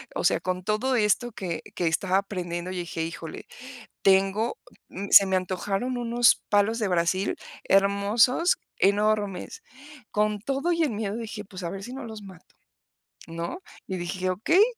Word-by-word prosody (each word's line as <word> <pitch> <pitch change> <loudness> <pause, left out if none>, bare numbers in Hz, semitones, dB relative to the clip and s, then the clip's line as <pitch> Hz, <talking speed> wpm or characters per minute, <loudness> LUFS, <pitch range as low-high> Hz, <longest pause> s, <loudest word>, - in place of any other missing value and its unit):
o - - -2
sea, - - +3
con 185 0 -3
todo 215 +6 0
esto 230 +2 +1
que 175 -5 -4
que 175 - 0
estaba 185 +3 +1
aprendiendo, 180 -3 -3
yo 185 - -5
dije: 170 -1 -3
"Híjole", 165 -1 -7 0.6
tengo 195 +4 +3 0.5
se 200 - +9
me 190 -1 0
antojaron 195 +6 -2
unos 240 0 +3
palos 205 +2 +3
de 215 -3 0
Brasil 180 +2 +1 0.3
hermosos, 200 - +3 0.2
enormes, 205 -1 +1 0.5
con 210 0 +1
todo 275 - -1
y 335 -1 +2
el 295 - +1
miedo 210 -1 -3
dije: 225 -2 -6
"Pues, 185 -1 -9
a 170 - -3
ver 195 0 -6
si 245 - -7
no 270 +1 -6
los 220 -2 -8
mato", 190 -4 -14 0.7
¿no?, 170 - -5 0.3
y 190 - -3
dije: 180 +1 -3
"Okey, 320 - +4
200 Hz, 160 wpm, -26 LUFS, 185-225 Hz, 0.7 s, se